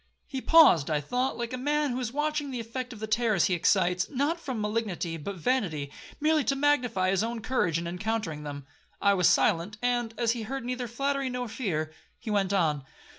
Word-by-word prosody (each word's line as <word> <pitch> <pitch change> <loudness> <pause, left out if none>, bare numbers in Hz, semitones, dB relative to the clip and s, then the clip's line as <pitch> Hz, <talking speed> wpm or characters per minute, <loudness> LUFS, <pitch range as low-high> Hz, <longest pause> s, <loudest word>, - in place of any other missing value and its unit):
He 265 -2 -5
paused, 285 - +6
I 150 -1 +1
thought, 250 - -1
like 240 0 -4
a - - -2
man 295 +1 +1
who 245 - -2
is 245 -3 -3
watching 295 +1 -1
the 255 -2 -4
effect 250 +3 -5
of 225 - -9
the 220 - -3
terrors 215 -4 +2
he 185 - +1
excites, 180 +1 +2
not 290 +5 0
from 260 -8 -4
malignity 210 -6 -2
but 180 +6 -5
vanity, 170 - -1 0.3
merely 310 0 +3
to 275 - +1
magnify 245 -10 +2
his 195 +2 +1
own 230 +1 -3
courage 215 -9 0
in 170 - -4
encountering 180 -3 -3
them. 145 -2 -7 0.3
I 200 - +4
was 180 -3 +4
silent; 205 +2 +2
and, 240 -2 -1
as 235 -2 +2
he 235 -1 -3
heard 265 +3 -5
neither 250 0 -3
flattery 275 +3 -1
nor 250 -1 -3
fear, 170 -10 -3 0.2
he 225 - -6
went 200 -2 +1
on. 155 -8 +1
225 Hz, 205 wpm, -28 LUFS, 180-255 Hz, 0.3 s, paused